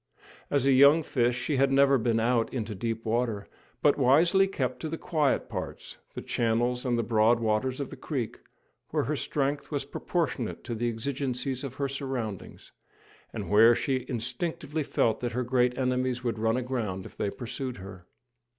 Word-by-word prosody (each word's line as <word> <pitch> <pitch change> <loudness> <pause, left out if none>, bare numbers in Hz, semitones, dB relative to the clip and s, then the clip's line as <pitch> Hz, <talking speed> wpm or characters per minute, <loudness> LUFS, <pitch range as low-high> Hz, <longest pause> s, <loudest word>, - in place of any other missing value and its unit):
As 140 -2 +1
a 135 - +5
young 140 +5 +6
fish 120 -4 +1
she 145 +2 -1
had 135 +1 +3
never 140 0 +5
been 115 0 +1
out 115 0 +1
into 115 -4 -3
deep 115 +3 -3
water, 115 -2 -1 0.4
but 145 0 +4
wisely 170 +9 +5
kept 130 -9 -2
to 160 - -4
the 165 - -3
quiet 155 -6 0
parts - - -7 0.2
the - - -5
channels 120 +2 0
and 120 -2 +1
the 115 - +1
broad 115 +1 +3
waters 115 +4 0
of 140 - -4
the - - -7
creek, 130 -8 -4 0.5
where - - 0
her - - -1
strength 145 0 -2
was 140 -3 -2
proportionate 165 +1 -2
to 120 - -4
the 120 +1 -1
exigencies 130 +2 -3
of 135 -2 -6
her 140 - -1
surroundings, 130 -7 -5 0.6
and - - -5
where 115 +3 +7
she 130 -1 -1
instinctively 155 - -3
felt 115 -5 +1
that 120 -2 -3
her 125 +2 -1
great 125 0 +1
enemies 125 -1 0
would 115 -3 -2
run 115 +2 +1
aground 115 -7 -3
if - - -11
they - - -1
pursued 125 +3 -5
her. 95 -2 -11
125 Hz, 180 wpm, -28 LUFS, 115-140 Hz, 0.6 s, where